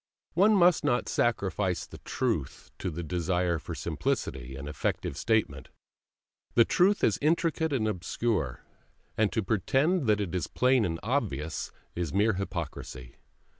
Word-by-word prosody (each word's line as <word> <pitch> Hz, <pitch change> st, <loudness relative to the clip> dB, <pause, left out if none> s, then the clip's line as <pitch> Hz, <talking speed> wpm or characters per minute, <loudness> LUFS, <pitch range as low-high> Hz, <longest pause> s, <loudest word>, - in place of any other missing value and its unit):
One 205 Hz, +6 st, +5 dB
must 175 Hz, -4 st, +5 dB
not 125 Hz, -4 st, +1 dB
sacrifice 100 Hz, -5 st, 0 dB
the -, -, -12 dB
truth -, -, -3 dB
to 95 Hz, -, -2 dB
the 85 Hz, +1 st, -5 dB
desire 90 Hz, 0 st, 0 dB
for -, -, -6 dB
simplicity 65 Hz, 0 st, -2 dB
and 70 Hz, +2 st, -7 dB
effective 75 Hz, -2 st, -2 dB
statement. 100 Hz, -, 0 dB, 0.9 s
The 115 Hz, -, +7 dB
truth 195 Hz, +3 st, +3 dB
is 110 Hz, -, +3 dB
intricate 160 Hz, +1 st, +1 dB
and 120 Hz, -6 st, +1 dB
obscure, 95 Hz, -, -1 dB, 0.5 s
and 110 Hz, -2 st, +2 dB
to 110 Hz, -, 0 dB
pretend 135 Hz, -, +1 dB
that 105 Hz, -1 st, +3 dB
it 100 Hz, -4 st, -3 dB
is 90 Hz, -, -1 dB
plain 125 Hz, -3 st, +3 dB
and 80 Hz, -2 st, -2 dB
obvious 100 Hz, -, -2 dB, 0.2 s
is 85 Hz, -1 st, -3 dB
mere 105 Hz, +3 st, +3 dB
hypocrisy. 80 Hz, -9 st, -5 dB
105 Hz, 140 wpm, -29 LUFS, 85-130 Hz, 0.9 s, The